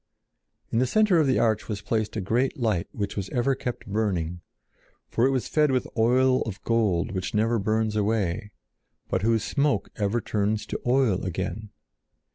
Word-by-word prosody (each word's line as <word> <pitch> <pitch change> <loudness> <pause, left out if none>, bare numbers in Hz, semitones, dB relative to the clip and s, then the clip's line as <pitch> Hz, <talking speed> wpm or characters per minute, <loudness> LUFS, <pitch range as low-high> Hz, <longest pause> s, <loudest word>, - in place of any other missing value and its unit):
In 115 - +1
the 130 - +2
center 210 - +4
of 155 - +3
the 130 - +3
arch 110 -1 +1
was 105 -2 -4
placed 110 -1 -1
a 110 - -1
great 120 +8 0
light 110 -9 0
which 100 -1 -4
was 100 -2 -3
ever 130 +2 +1
kept 125 -2 -5
burning, 90 -5 -1 0.7
for 120 +3 +3
it - - +2
was 130 -2 -1
fed 150 -1 +2
with 130 -2 +1
oil 130 +3 +3
of 105 -4 -4
gold 105 -7 +1
which 95 +1 -3
never 115 +2 +2
burns 110 +1 0
away, 105 -2 0 0.6
but 95 - 0
whose 110 +1 +2
smoke 145 0 0
ever 105 +2 0
turns 105 -1 -1
to - - -5
oil 125 -7 +2
again. 95 +3 -4
110 Hz, 175 wpm, -26 LUFS, 100-125 Hz, 0.7 s, center